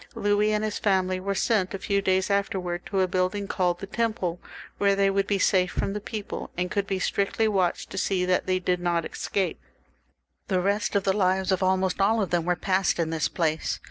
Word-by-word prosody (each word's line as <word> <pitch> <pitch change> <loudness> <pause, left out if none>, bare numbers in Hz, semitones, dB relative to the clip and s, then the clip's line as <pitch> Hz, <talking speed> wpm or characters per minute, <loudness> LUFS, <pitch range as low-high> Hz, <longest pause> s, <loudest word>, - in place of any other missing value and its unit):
Louis 205 -1 +2
and 210 0 0
his 215 -1 -2
family 185 -3 +1
were 195 +1 -2
sent 200 -3 +1
a - - -2
few 200 +1 0
days 190 0 +1
after 200 -1 0
wards 175 -1 -4
to 195 -1 0
a 185 - +2
building 185 +2 -1
called 180 -3 0
the 195 - -7
Temple, 215 -5 -2 0.4
where 200 -1 +3
they 195 0 +3
would 195 0 0
be 200 - +1
safe 185 -1 +3
from 195 - -2
the 210 - -4
people, 210 0 -6
and 180 +1 -1
could 200 -1 -1
be 195 - -1
strictly 200 +4 0
watched 190 -4 0
to 195 - -3
see 185 -2 0
that 180 0 +1
they 185 0 +2
did 180 -1 0
not 175 -1 0
escape. 195 -3 -2 0.9
The 185 -2 +1
rest 200 +4 0
of 200 - +2
the 195 - +2
lives 190 -1 +1
of 190 - +1
almost 185 0 +1
all 220 +3 +3
of 200 - -1
them 175 -2 +1
were 180 0 +2
passed 190 +1 +1
in 165 -2 -1
this 160 -1 0
place. 160 -2 -1
190 Hz, 225 wpm, -26 LUFS, 180-200 Hz, 0.9 s, where